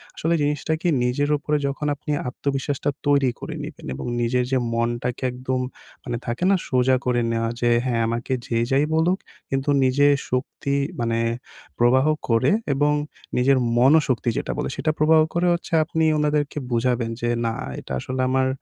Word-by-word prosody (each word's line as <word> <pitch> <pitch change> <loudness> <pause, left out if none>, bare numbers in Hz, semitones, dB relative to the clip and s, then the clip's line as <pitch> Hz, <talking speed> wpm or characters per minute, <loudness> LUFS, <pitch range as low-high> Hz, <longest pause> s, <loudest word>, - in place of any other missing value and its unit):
আসলে 165 +2 0
জিনিসটা 150 +2 0
কি 175 - -1 0.2
নিজের 130 +4 0
উপরে 150 +1 -1
যখন 145 +2 -3
আপনি 145 - -6 0.2
আত্মবিশ্বাসটা 140 +2 -2 0.2
তৈরি 140 -2 +4
করে - - -6
নিবেন - - -9
এবং - - -6 0.2
নিজের 125 +1 +1
যে 135 - +3 0.2
মনটাকে 120 +2 -2
একদম 130 +1 -3 0.4
মানে 120 -2 -3
থাকে 120 +6 -3
না? 195 - +5
সোজা 130 0 +3
করে 125 -1 +2
নেওয়া 115 0 0
যে 120 - +3 0.2
হ্যাঁ, 120 -3 0
আমাকে 120 +3 -2
যে 115 - 0
যাই 140 +2 +3
বলুক, 165 +4 +2 0.3
কিন্তু 135 +1 -1
নিজের 145 +3 +4 0.2
শক্তি 135 +2 -2 0.2
মানে 115 -1 0 0.6
প্রবাহ 125 +3 +4 0.2
করে 115 +4 +3 0.2
এবং 145 +2 +2 0.4
নিজের 135 +2 +4 0.2
মনোশক্তি 130 -1 +4
যেটা - - -2
বলে 150 - -2
সেটা 150 +3 0
প্রবাহ 155 +1 +5
করে 175 +1 +1
হচ্ছে 170 +1 -5
আপনি 160 +1 -1
ওনাদেরকে 150 -1 0
বুঝাবেন 120 0 +1
যে 120 - 0 0.2
না 115 - 0 0.3
এটা - - -11
আসলে 130 - -3
আমার 130 0 +2
130 Hz, 165 wpm, -23 LUFS, 120-145 Hz, 0.6 s, না